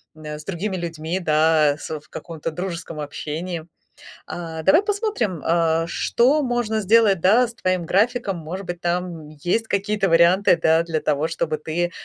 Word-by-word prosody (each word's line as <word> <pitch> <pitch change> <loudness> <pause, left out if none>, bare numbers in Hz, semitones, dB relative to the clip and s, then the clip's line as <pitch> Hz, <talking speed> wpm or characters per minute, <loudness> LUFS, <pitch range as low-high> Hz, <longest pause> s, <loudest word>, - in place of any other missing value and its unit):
э, 150 -1 -7
с 150 - -12
другими 195 +1 -3
людьми, 165 +1 -3
да, 155 -2 +3
с 155 -1 -5
в - - -25
каком-то 165 -2 -6
дружеском 170 -2 -5
общении. 160 +3 -5 0.6
А, 165 -2 -6
давай 260 - +5
посмотрим, 405 - -1
а, 165 -1 +2
что 270 - +2
можно 240 -3 -1
сделать, 205 -2 +4
да, 230 +6 +5
с 235 - -10
твоим 185 -5 -1
графиком. 205 0 +1
Может 175 +4 -6
быть, 175 -1 -6
там 175 -3 -3
есть 175 +9 -2
какие-то 200 0 0
варианты, 175 +3 +5
да, 160 +1 +4
для 165 -2 -2
того, 150 +1 0
чтобы 160 -2 -2
ты 175 +3 -2
175 Hz, 160 wpm, -22 LUFS, 160-200 Hz, 0.6 s, давай